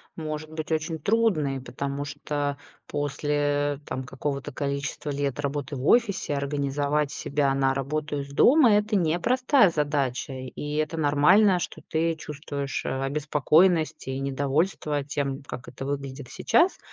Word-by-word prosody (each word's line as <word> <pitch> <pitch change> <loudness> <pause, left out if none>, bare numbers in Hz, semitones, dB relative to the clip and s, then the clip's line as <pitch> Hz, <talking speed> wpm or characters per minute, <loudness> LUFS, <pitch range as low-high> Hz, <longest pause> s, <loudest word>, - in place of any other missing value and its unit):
может 155 -1 -5
быть 155 0 -5
очень 160 +1 -1
трудной. 155 - +1
Потому 140 +2 -4
что 145 0 -3 0.3
после, 145 0 0
там, 130 - -4
какого-то 140 +1 -4
количества 140 +2 -3
лет 140 -1 -2
работы 140 0 -3
в 130 +2 -5
офисе 210 -10 +3
организовать 140 +1 0
себя 140 -2 0
на 135 -1 +2
работу 145 +2 -2
из 140 0 -9
дома- 255 - +6
это 210 +1 +1
непростая 210 - +3
задача. 145 -4 -1
И 130 +3 -6
это 155 +1 -1
нормально, 160 +7 +5
что - - -5
ты 165 +1 0
чувствуешь, 145 -3 -5
э, - - -1
обеспокоенность 150 +4 +2
и 130 0 -3
недовольство 145 +2 0
тем, 140 -1 -3
как 130 -2 -8
это 135 - -7
выглядит 140 -2 -5
сейчас. 350 - +2
145 Hz, 135 wpm, -26 LUFS, 140-155 Hz, 0.3 s, дома